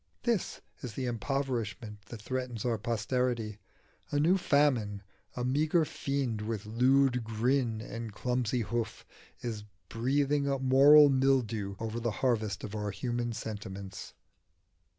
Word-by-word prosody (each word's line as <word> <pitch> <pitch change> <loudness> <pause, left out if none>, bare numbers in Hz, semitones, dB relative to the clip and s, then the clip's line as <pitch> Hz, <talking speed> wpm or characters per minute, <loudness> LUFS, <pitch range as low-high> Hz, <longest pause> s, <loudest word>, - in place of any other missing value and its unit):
This 235 -6 -1 0.2
is 125 -5 -6
the 130 - -3
impoverishment 120 -4 -3
that 110 -3 -9
threatens 125 -2 -3
our 115 -3 0
posterity: 115 -1 -1 0.5
a 145 - 0
new 165 +5 +4
Famine, 130 - +2 0.3
a 125 - -2
meagre 155 +5 +2
fiend 135 -7 -2
with 105 -1 -3
lewd 125 +3 +3
grin 115 +1 0
and 115 -1 -6
clumsy 125 +2 -1
hoof, 115 0 -3 0.4
is 115 -4 -4 0.3
breathing 140 +4 +1
a 140 -1 +1
moral 140 +3 +7
mildew 125 -7 +1
over 115 0 -3
the 120 0 -1 0.2
harvest 110 -5 0
of 105 - -6
our 105 -1 -2
human 120 +4 -2
sentiments. 100 -3 -7
120 Hz, 130 wpm, -30 LUFS, 110-135 Hz, 0.5 s, moral